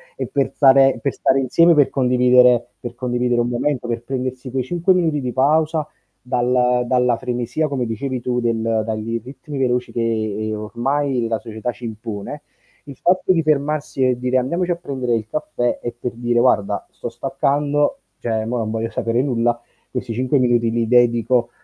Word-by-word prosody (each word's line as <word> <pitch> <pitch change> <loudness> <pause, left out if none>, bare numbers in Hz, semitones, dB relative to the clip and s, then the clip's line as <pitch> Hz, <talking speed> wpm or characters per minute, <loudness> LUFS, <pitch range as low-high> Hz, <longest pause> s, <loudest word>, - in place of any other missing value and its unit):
è - - -3
per 140 -1 -1
stare 135 -1 +5
per 140 - -1
stare 135 - +2
insieme, 165 +6 +4
per 145 -2 +4
condividere 125 -2 +4
per 120 -1 -7
condividere 125 -1 0
un 120 - -1
momento, 125 0 -1
per 120 0 -3
prendersi 130 0 -4
quei 130 -1 -1
5 175 +6 +1
minuti 160 -5 +1
di 125 -1 -3
pausa 155 +3 +2 0.4
dal 125 0 +1
dalla 125 -2 +2
frenesia 125 +4 -2
come 130 -4 -2
dicevi 125 +3 -3
tu 125 0 -1
del 115 -2 0
dai 110 +1 -3
ritmi 140 +2 -9
veloci 125 -1 0
che 110 -2 -2
ormai 120 +3 -1
la 115 -1 -1
società 110 +3 -5
ci 120 - -16
impone, 110 +4 -6 0.4
il 140 -2 -10
fatto 185 +4 +2
di 165 - +2
fermarsi 145 -2 0
e 125 -1 +1
dire 125 +1 +1
andiamoci 170 +8 0
a - - +1
prendere 130 -8 -2
il 110 -1 -3
caffè 120 -5 -2
è 120 - -4
per 125 - -4
dire: 120 0 0
"Guarda 100 -3 +1
sto - - -6
staccando 145 - 0 0.2
cioè 110 -2 -2
mo 120 +2 -2
non 110 -1 -2
voglio 115 0 -2
sapere 115 +2 0
nulla." 120 -3 0 0.3
Questi 125 -2 -4
5 130 +3 +1
minuti 120 -2 +2
li 115 -1 0
dedico 120 0 +3
125 Hz, 175 wpm, -20 LUFS, 120-135 Hz, 0.4 s, stare